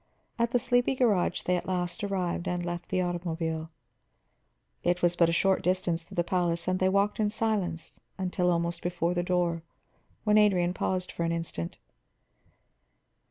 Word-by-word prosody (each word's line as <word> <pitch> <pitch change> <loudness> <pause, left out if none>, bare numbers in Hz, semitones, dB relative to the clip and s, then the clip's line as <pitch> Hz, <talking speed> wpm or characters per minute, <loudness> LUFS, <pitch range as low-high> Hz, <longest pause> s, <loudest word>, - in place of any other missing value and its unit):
At 235 0 +2
the 245 - +3
sleepy 245 +1 +2
garage 210 -9 +2
they 180 - +1
at - - -5
last 180 +2 -2
arrived, 185 -3 -1
and 175 -1 -1
left 175 0 -4
the 185 -1 +1
automobile. 165 -2 -2 1.1
It 175 +1 +1
was 175 0 +4
but 170 -1 +4
a - - +2
short 190 +3 +2
distance 180 -2 0
to - - -12
the 175 - +2
palace, 170 -1 0
and 185 0 +1
they 185 - +3
walked 200 +2 +1
in 210 -1 +2
silence 200 -7 -2 0.2
until 180 -1 0
almost 170 0 -1
before 175 0 0
the 175 - 0
door, 175 -2 0 0.6
when 210 0 +5
Adrian 180 -4 +3
paused 185 0 -2
for 170 - -3
an 165 - 0
instant. 165 - -4
180 Hz, 165 wpm, -29 LUFS, 170-190 Hz, 1.1 s, when